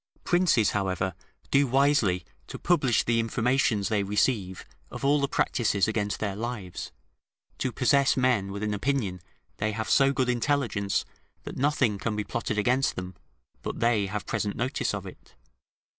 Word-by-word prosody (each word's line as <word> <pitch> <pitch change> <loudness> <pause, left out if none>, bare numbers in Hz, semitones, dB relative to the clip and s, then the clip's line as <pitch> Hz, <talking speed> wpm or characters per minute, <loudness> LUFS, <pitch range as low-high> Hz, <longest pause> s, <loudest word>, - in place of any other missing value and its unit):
Princes, 175 - +3
however, 95 -2 -1 0.4
do 140 0 +4
wisely 130 - +2 0.2
to - - -7
publish 145 -9 +2
the 115 0 +1
informations 115 -2 +1
they 105 -1 +1
receive 100 -1 0 0.2
of - - -6
all 145 +1 +3
the 140 - +1
practices 105 -7 +1
against 105 -2 -1
their 100 -3 -2
lives, 110 -5 -5 0.7
to 130 - -1
possess 135 +3 +3
men 120 -7 +2
with 100 +1 -5
an 105 -1 -1
opinion 105 -5 -1 0.4
they 105 +1 -1
have 110 0 -3
so 135 0 +5
good 130 -2 0
intelligence 120 -5 0 0.4
that - - -7
nothing 130 -7 +1
can 110 +1 -2
be 105 - -1
plotted 110 0 -3
against 125 +5 +2
them, 90 0 -6 0.5
but - - -5
they 115 -4 +2
have 105 +1 -4
present 105 -2 -2
notice 125 +3 -1
of - - -6
it. - - -13
115 Hz, 160 wpm, -27 LUFS, 100-130 Hz, 0.7 s, so